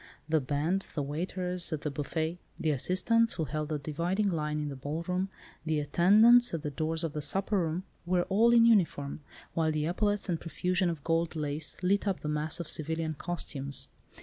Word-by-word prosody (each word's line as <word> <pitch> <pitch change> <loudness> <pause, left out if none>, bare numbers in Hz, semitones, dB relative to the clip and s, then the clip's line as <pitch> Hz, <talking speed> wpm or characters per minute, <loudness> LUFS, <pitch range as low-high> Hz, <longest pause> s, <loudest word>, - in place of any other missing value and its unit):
The 160 -1 +2
band, 150 +8 -1
the 145 - -1
waiters 180 +4 -2
at 155 -2 -2
the 150 - -2
buffet, 160 +4 -3 0.2
the 155 - 0
assistants 215 - +3
who 165 - -2
held 150 +2 -3
the 155 - -1
dividing 170 +8 -1
line 150 -2 -2
in 150 -1 -3
the 140 - -6
ball 145 +5 -4
room, 185 +2 -1 0.3
the 155 -1 0
attendants 215 +9 +5
at 160 - -5
the 150 - -3
doors 160 +3 -2
of 160 -3 -2
the 150 - -3
supper 195 +7 +2
room, 170 +1 -2 0.2
were 180 0 +2
all 220 +6 +3
in 235 -1 +6
uniform, 165 -10 +2 0.3
while 160 -1 +1
the 155 -1 -1
epaulettes 205 +4 0
and 170 -3 -2
profusion 180 +2 0
of 160 -4 -5
gold 165 0 0
lace 150 0 +1
lit 200 +3 +2
up 195 -2 -1
the - - -5
mass 150 +3 -2
of 170 - -5
civilian 160 +1 -2
costumes. 140 -4 -4
165 Hz, 195 wpm, -30 LUFS, 150-185 Hz, 0.3 s, in